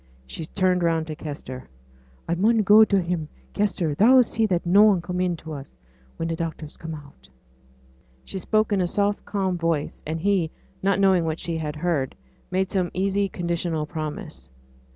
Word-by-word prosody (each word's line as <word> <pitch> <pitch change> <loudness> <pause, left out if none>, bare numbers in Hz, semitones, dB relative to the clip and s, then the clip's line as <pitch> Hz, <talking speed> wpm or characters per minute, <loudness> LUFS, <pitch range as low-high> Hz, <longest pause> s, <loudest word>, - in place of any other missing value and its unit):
She 155 - -6
turned 185 -1 +1
round 165 -2 +1
to 155 -1 -6
Kester. 140 -4 -7 0.6
'I 170 - 0
mun 215 +7 +3
go 210 +2 +8
to 200 -2 +3
him, 170 -4 -2 0.2
Kester; 185 -6 0
thou'll 250 - +6
see 225 -1 0
that 180 -4 0
noane 200 +2 +6
come 180 +1 -3
in 180 -2 0
to 160 0 -8
us, 140 -2 -9 0.4
when 165 - -2
t' 165 - -1
doctors 160 -2 -5
come 160 -1 -6
out.' 145 -2 -14 1.0
She 190 - -5
spoke 215 +4 +1
in 195 - +2
a 180 - +1
soft, 205 +2 0
calm 190 -3 -1
voice; 165 -3 -1
and 160 +1 -2
he, 190 -2 +1 0.3
not 195 +1 +2
knowing 190 -3 +4
what 160 0 -2
she 170 - -3
had 150 -1 -4
heard, 150 -4 -1 0.3
made 185 +1 0
some 185 -3 0
easy 195 +1 +1
conditional 170 -3 -2
promise. 150 - -6
175 Hz, 175 wpm, -24 LUFS, 160-195 Hz, 1.0 s, go